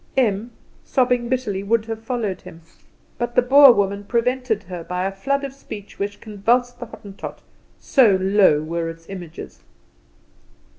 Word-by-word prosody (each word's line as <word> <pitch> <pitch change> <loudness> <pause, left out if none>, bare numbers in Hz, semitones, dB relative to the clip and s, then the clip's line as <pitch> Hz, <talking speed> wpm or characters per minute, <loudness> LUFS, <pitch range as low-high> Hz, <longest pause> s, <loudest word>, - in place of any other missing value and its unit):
Em, 225 -3 +1 0.3
sobbing 250 -2 +1
bitterly, 245 -7 -1
would 220 +2 +1
have 225 -1 -5
followed 225 -6 -3
him; 170 -2 -12 0.6
but 240 0 -3
the - - +6
Boer 275 +2 +8
woman 200 -2 0
prevented 235 -1 0
her 180 -2 -7
by 180 +2 -3
a 195 - -1
flood 275 +8 -1
of 275 -1 -5
speech 210 -7 -10
which 200 0 -3
convulsed 240 +4 0
the 245 - -6
Hottentot, 200 -3 -10 0.4
so 230 -8 +4
low 190 -6 +4
were 165 +1 -3
its 165 0 -11
images. 175 -4 -9
215 Hz, 150 wpm, -21 LUFS, 195-245 Hz, 0.6 s, Boer